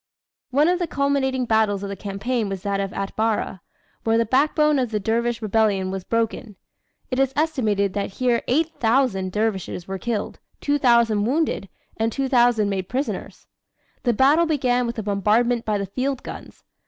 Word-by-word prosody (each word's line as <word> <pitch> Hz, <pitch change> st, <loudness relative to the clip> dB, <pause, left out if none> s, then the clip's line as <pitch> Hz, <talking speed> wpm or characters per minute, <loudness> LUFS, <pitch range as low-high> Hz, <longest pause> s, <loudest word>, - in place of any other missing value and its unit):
One 285 Hz, +4 st, +3 dB
of 355 Hz, 0 st, +2 dB
the 350 Hz, -, -1 dB
culminating 275 Hz, -3 st, 0 dB
battles 220 Hz, -3 st, +1 dB
of 200 Hz, -, -4 dB
the 200 Hz, -, -4 dB
campaign 205 Hz, +3 st, -2 dB
was 195 Hz, -1 st, -5 dB
that 200 Hz, -1 st, -1 dB
of 195 Hz, -1 st, -2 dB
Atbara, 200 Hz, -1 st, -2 dB, 0.4 s
where 225 Hz, 0 st, +2 dB
the 230 Hz, -, +2 dB
backbone 295 Hz, +4 st, +3 dB
of 250 Hz, -2 st, 0 dB
the 215 Hz, -1 st, -1 dB
dervish 230 Hz, +2 st, -1 dB
rebellion 205 Hz, -3 st, +1 dB
was 190 Hz, -1 st, -4 dB
broken. 230 Hz, 0 st, -2 dB, 0.6 s
It 255 Hz, -, 0 dB
is 270 Hz, -1 st, +2 dB
estimated 220 Hz, -, +1 dB
that 200 Hz, -1 st, -3 dB
here 245 Hz, 0 st, +1 dB
8,000 250 Hz, -, +1 dB
dervishes 200 Hz, -4 st, -2 dB
were 190 Hz, 0 st, -4 dB
killed, 225 Hz, -2 st, -3 dB, 0.2 s
2,000 235 Hz, -7 st, +3 dB
wounded, 275 Hz, -, 0 dB, 0.3 s
and 225 Hz, +1 st, 0 dB
2,000 245 Hz, -5 st, +2 dB
made 190 Hz, -2 st, -3 dB
prisoners. 270 Hz, +3 st, -4 dB, 0.6 s
The 240 Hz, -, +1 dB
battle 290 Hz, +8 st, +4 dB
began 250 Hz, -5 st, +1 dB
with 235 Hz, -, -4 dB
a 220 Hz, -, -3 dB
bombardment 215 Hz, +4 st, +1 dB
by 215 Hz, -1 st, 0 dB
the 200 Hz, -, -2 dB
field 260 Hz, +7 st, -3 dB
guns. -, -, -10 dB
230 Hz, 165 wpm, -23 LUFS, 205-265 Hz, 0.6 s, battle